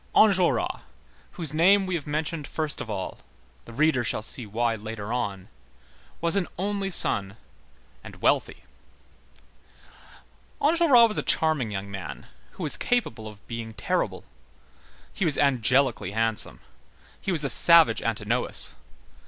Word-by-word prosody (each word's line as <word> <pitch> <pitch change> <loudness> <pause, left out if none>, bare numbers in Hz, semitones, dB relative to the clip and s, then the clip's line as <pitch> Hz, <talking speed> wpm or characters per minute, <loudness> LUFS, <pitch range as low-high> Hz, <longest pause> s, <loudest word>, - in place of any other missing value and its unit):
Enjolras, 190 -5 +3 0.5
whose 160 -6 -2
name 190 +5 +4
we 185 - -3
have 155 -4 -3
mentioned 155 0 -3
first 155 -2 -3
of - - -7
all,—the 65 - -9
reader 145 -1 +2
shall 110 -1 -2
see 115 0 0
why 115 +3 0
later 110 0 -6
on,—was 95 - -6
an 195 -3 0
only 200 +1 -2
son 100 - +1 0.7
and - - -11
wealthy. - - 0 2.0
Enjolras 295 -7 +5
was 210 - -4
a - - 0
charming 155 -8 +1
young 100 -1 -5
man, 90 -8 -7 0.3
who 185 - -7
was 150 - 0
capable 115 - -1
of 105 -1 -13
being 115 -1 -6
terrible. - - -2 0.9
He - - -3
was 155 -5 +1
angelically 130 -6 +2
handsome. 110 0 0 0.6
He 195 - -2
was 160 -4 -1
a - - 0
savage 170 -2 +5
Antinous. 115 +2 +2
130 Hz, 130 wpm, -25 LUFS, 110-170 Hz, 2.0 s, Enjolras